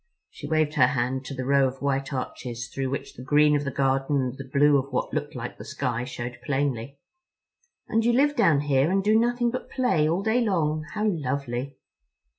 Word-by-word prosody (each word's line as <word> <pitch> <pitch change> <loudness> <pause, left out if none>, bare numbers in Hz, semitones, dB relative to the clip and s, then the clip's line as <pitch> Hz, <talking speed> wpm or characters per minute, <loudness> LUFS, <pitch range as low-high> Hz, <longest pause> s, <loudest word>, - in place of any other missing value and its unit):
She - - -8
waved 155 -1 +1
her 130 -5 +5
hand 130 +1 -1
to 135 - -6
the 130 - -4
row 140 0 +4
of 130 +1 -6
white 135 0 -1
arches 120 -2 -5
through 135 -1 -2
which 140 - -5
the - - -11
green 150 +2 +4
of 145 - 0
the 140 - -2
garden 135 +1 0
and 130 -1 -2
the 135 -1 -9
blue 145 0 +5
of 135 +1 -6
what 125 - -2
looked - - -3
like - - -6
the - - -7
sky 120 +2 -3
showed 120 -1 -6
plainly. 140 -2 -2 0.9
"And 225 +1 +1
you 240 - +3
live 290 +4 +3
down 145 -3 +4
here 140 0 +2
and 195 +1 +1
do 210 +2 +3
nothing 240 +1 +2
but 255 - -5
play 205 - +1
all 175 +4 0
day 225 +4 +2
long? 155 -7 0
How 210 0 0
lovely." 140 - -2
140 Hz, 210 wpm, -25 LUFS, 130-160 Hz, 0.9 s, her